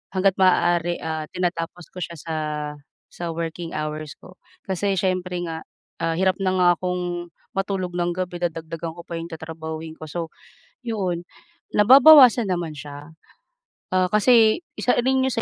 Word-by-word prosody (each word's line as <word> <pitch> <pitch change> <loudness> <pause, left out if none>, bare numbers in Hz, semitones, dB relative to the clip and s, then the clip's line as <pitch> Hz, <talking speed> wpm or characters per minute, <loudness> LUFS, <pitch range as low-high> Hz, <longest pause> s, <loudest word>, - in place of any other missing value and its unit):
hangga't 190 0 +2
maaari, 175 -2 +3
ah, 160 -1 -3
tinatapos 175 -1 -3
ko 185 - -9
siya 170 -1 -5
sa 160 +2 -5 0.8
sa 170 -1 -5
working 165 0 -5
hours 155 -1 -4
ko 185 0 -15 0.3
kasi 195 +1 0
siyempre 185 -1 -1
nga, 165 -1 -6 0.3
ah, 165 0 0
hirap 185 +1 +2
na 190 -1 +1
nga 180 -1 +4
akong 180 -1 -3 0.3
matulog 195 -2 -2
ng 175 0 0
gabi 180 -1 -4
dadagdagan 165 -1 -4
ko 170 - -10
pa 170 -1 -6
'yong 165 - -6
tatrabahuhin 160 0 -7
ko. 155 - -8
So, 165 +1 -5 0.5
'yon 185 -7 -2 0.5
nababawasan 255 +1 +8
naman 175 -3 -2
siya, 145 +2 -10 0.8
ah, 185 0 +3
kasi 220 - +5 0.2
isa 250 - +2
rin 260 +2 +2
yun 265 - 0
sa 230 - -1
175 Hz, 150 wpm, -23 LUFS, 165-190 Hz, 0.8 s, nababawasan